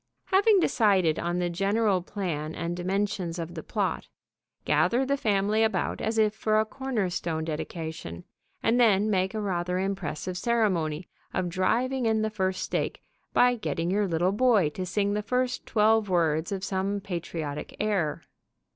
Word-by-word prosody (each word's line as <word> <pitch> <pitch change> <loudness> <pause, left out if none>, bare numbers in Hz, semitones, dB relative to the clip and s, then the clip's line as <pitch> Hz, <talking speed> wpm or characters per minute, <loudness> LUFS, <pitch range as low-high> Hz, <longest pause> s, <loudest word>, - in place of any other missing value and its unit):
Having 400 +2 +5
decided 190 - +3
on 175 +1 -1
the 180 0 0
general 195 +2 +1
plan 165 -5 -4
and 170 +1 -3
dimensions 185 -1 -2
of 170 0 -5
the 160 - -6
plot, - - -2 0.6
gather 250 +3 +2
the 280 +1 +1
family 210 -3 +1
about 220 -4 0
as 220 +1 -1
if 215 -1 +3
for 215 0 +1
a 220 - +2
corner 250 -4 -2
stone 165 -3 -2
dedication, 160 - -5 0.4
and 230 +2 +3
then 215 -3 +4
make 190 +1 0
a - - -1
rather 180 -3 -1
impressive 185 -2 -3
ceremony 180 -8 0 0.3
of 180 - 0
driving 235 +8 +1
in 220 -1 +2
the 220 - -1
first 190 -3 -1
stake - - -2 0.3
by 245 0 +4
getting 180 -7 -2
your 205 +1 +1
little 175 +2 +1
boy 210 -6 +3
to 185 +4 -5
sing 200 +2 0
the 210 - 0
first 250 +4 -1
twelve 220 -1 +3
words 165 -2 +1
of 195 -1 -3
some 195 +1 -1
patriotic 170 -6 -5
air. 195 -8 0
195 Hz, 160 wpm, -27 LUFS, 175-220 Hz, 0.6 s, Having